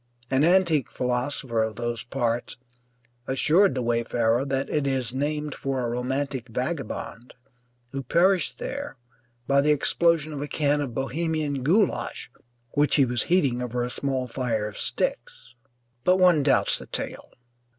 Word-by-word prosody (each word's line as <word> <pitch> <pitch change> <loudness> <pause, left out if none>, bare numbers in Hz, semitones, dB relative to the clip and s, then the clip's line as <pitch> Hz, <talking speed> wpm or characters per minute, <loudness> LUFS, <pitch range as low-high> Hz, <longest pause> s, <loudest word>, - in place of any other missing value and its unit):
An 135 +2 +3
antique 170 -5 +3
philosopher 125 -1 -1
of 110 -1 -1
those 120 -1 -3
parts 120 -1 -2 0.7
assured 155 +5 +3
the 130 - -1
wayfarer 115 +1 +1
that 135 0 -1
it 150 -2 0
is 130 -3 -1
named 150 +2 -2
for 135 -1 -3
a - - -1
romantic 130 +1 -2
vagabond 125 -2 -4 0.6
who 135 - -3
perished 180 +8 +2
there 280 - -5 0.5
by 140 +2 +3
the 150 - +1
explosion 155 +1 +2
of 140 - -5
a 145 - -3
can 145 -1 +1
of 125 -5 -4
Bohemian 145 +1 -1
goulash 185 - 0 0.4
which 145 0 +2
he 140 - +5
was 120 -1 -1
heating 140 -9 +2
over 125 0 -2
a 125 - -3
small 130 -2 -2
fire 115 -4 -2
of 105 - -8
sticks; - - -3 0.5
but 180 +5 +4
one 180 -5 +5
doubts 135 -1 +2
the - - -11
tale. - - -5
135 Hz, 150 wpm, -25 LUFS, 125-150 Hz, 0.7 s, he